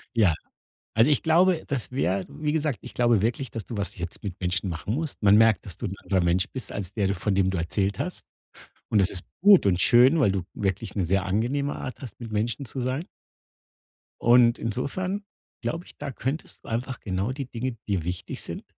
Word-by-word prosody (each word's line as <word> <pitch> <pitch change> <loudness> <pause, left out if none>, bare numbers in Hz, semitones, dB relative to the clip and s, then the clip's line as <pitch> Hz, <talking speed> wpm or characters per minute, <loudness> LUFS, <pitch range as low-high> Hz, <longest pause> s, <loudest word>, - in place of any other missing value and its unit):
Ja. 100 -7 +5 0.6
Also, 115 +7 +5
ich 145 - +3
glaube, 170 +1 +4
das 135 -5 -3
wäre 100 -7 0
wie 150 +1 -2
gesagt, 150 -5 0
ich - - -9
glaube 120 -4 +3
wirklich, 125 +4 -1
dass 115 -3 -5
du 115 - -6
was 100 - -3
jetzt 85 -1 -6
mit 95 -4 -5
Menschen 90 0 -1
machen 90 +6 -3
musst. 155 -6 -4
Man 100 0 +7
merkt, 110 -2 +5
dass 95 - -8
du 120 - -3
'n 95 - -4
anderer 95 -2 +1
Mensch 85 +3 +2
bist, 125 -6 -5
als 100 -1 -4
der 105 -3 0
du 100 - +1
von 100 +2 -1
dem 95 -1 +3
du 95 - -2
erzählt 95 +4 -1
hast. - - -4 0.7
Und 105 - +3
es 95 - +2
ist 90 - -4 0.2
gut 200 - +7
und 90 -2 +3
schön, 130 - +6
weil 105 - +4
du 95 -2 -1
wirklich 100 +1 -2
'ne 95 -4 0
sehr 95 +2 +1
angenehme 125 +9 0
Art 130 - -6
hast, 130 - -9
mit 115 - -7
Menschen 110 +5 -1
zu 130 - -6
sein. 130 +7 -2 1.1
Und 120 0 +5
insofern 180 - -2 0.4
glaube 165 +2 -3
ich, - - -16
da 145 -1 -5
könntest 135 +5 -4
du - - -11
einfach 125 +3 -3
genau 95 +4 -2
die 135 0 -4
Dinge, 125 0 -3
die 95 -6 0
wichtig 90 +2 -5
sind, - - -6
115 Hz, 215 wpm, -26 LUFS, 95-135 Hz, 1.1 s, Man